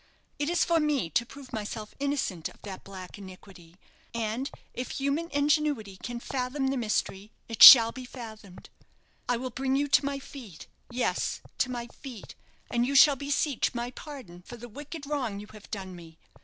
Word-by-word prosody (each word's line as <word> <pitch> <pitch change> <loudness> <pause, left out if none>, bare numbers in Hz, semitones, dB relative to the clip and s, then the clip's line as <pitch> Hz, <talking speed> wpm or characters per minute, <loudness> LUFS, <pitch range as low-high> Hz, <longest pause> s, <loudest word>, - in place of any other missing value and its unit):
It 290 +1 0
is 350 - +2
for 335 -1 +3
me 290 - 0
to 235 - +1
prove 275 -1 -12
myself 215 0 -5
innocent 275 - -2
of - - -18
that 195 -2 -8
black 190 0 -10
iniquity; 185 -3 -13 0.4
and 230 +4 -2 0.2
if 250 - -5
human 280 +5 -1
ingenuity 285 - +1
can 240 +4 -6
fathom 265 +2 -2
the 270 - 0
mystery, 215 -3 -2 0.2
it 225 -2 -6
shall 230 -3 +12
be 255 +1 -8
fathomed. 220 -7 -11 0.6
I 245 - +2
will 255 +1 -5
bring 265 +2 -1
you 285 +1 +1
to 275 - +5
my 280 0 -2
feet 245 - -11 0.2
yes, 245 0 -1 0.2
to 255 - +2
my 240 -1 -4
feet; 240 -2 -11 0.4
and 240 0 +2
you 275 +3 -1
shall 285 +1 +8
beseech 280 -1 0
my 240 +1 -3
pardon 255 - -10
for 240 +7 -11
the 240 +1 -9
wicked 290 +5 -8
wrong 255 -9 -2
you 205 - -8
have 215 -1 -13
done 190 -3 -6
me. 165 -2 -13
245 Hz, 180 wpm, -28 LUFS, 210-280 Hz, 0.6 s, shall